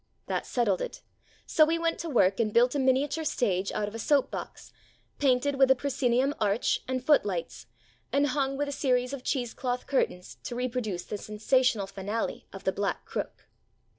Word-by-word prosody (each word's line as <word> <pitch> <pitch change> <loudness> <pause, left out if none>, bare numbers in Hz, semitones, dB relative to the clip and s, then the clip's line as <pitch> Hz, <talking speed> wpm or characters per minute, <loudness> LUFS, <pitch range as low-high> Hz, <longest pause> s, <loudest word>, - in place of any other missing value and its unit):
That - - -2
settled 215 -7 +1
it, - - -6 0.4
so 315 - +4
we 325 +2 +2
went 330 0 -1
to 335 - -4
work 195 -8 +3
and 220 -2 +1
built 245 +3 +4
a 290 - 0
miniature 270 +4 +1
stage 195 -10 0
out 205 - -1
of 210 - -7
a 225 - -6
soap 285 +2 +2
box, - - -7 0.5
painted 275 0 +2
with 270 -1 +6
a 265 - +6
proscenium 265 0 +1
arch 210 +2 +1
and 255 0 -2
foot 295 -1 +5
lights, 180 -5 -4 0.4
and 280 +1 +3
hung 275 0 0
with 290 +1 -1
a - - -3
series 250 -2 0
of 270 -2 -6
cheese 245 -4 -1
cloth 250 -1 -3
curtains 180 -9 -1
to 240 - -4
reproduce 240 -7 -2
the 210 - -5
sensational 215 +1 +1
finale 200 +3 -4
of 195 0 -10
"The 190 - +2
Black 200 0 -2
Crook." - - -5
250 Hz, 190 wpm, -28 LUFS, 210-275 Hz, 0.5 s, with